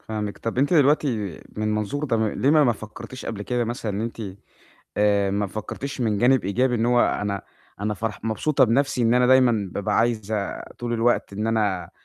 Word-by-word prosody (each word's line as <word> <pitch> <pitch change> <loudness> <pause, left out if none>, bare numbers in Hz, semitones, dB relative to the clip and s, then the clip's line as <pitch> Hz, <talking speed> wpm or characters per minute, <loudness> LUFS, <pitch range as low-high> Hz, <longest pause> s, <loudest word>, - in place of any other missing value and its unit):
فاهمِك. 105 -2 -5
طَب 115 +2 -4
أنتِ 145 +6 +3
دلوقتي 135 - +2 0.2
من 105 - -3
المنظور 110 +7 -1
ده، 115 -5 +1
ليه 135 - +2
ما 155 -1 +5
ما 120 - +4
فكرتيش 110 +4 -9
قبل 105 -3 -4
كده 120 +2 -1
مثلًا 115 -2 -3
إن 100 - -3
أنتِ 115 0 -4 0.7
آآ 100 -1 +3
ما 100 +1 0
فكرتيش 130 +7 -6
من 110 -4 +1
جانب 125 +1 +3
إيجابي 125 +6 +1
إن 115 0 +1
هو 120 0 +4
أنا 100 -3 0 0.4
أنا 105 +1 -1
فرح 110 +1 -5
مبسوطة 120 +6 +2
بنفسي 130 +2 +1
إن 115 +1 +3
أنا 125 0 +4
دايمًا 125 -6 +4
بابقى 100 - -1
عايزة 110 -3 -1 0.2
طول 120 -1 -3
الوقت 120 -2 +1
إن 105 +2 -2
أنا 105 -5 0
115 Hz, 190 wpm, -24 LUFS, 105-125 Hz, 0.7 s, ما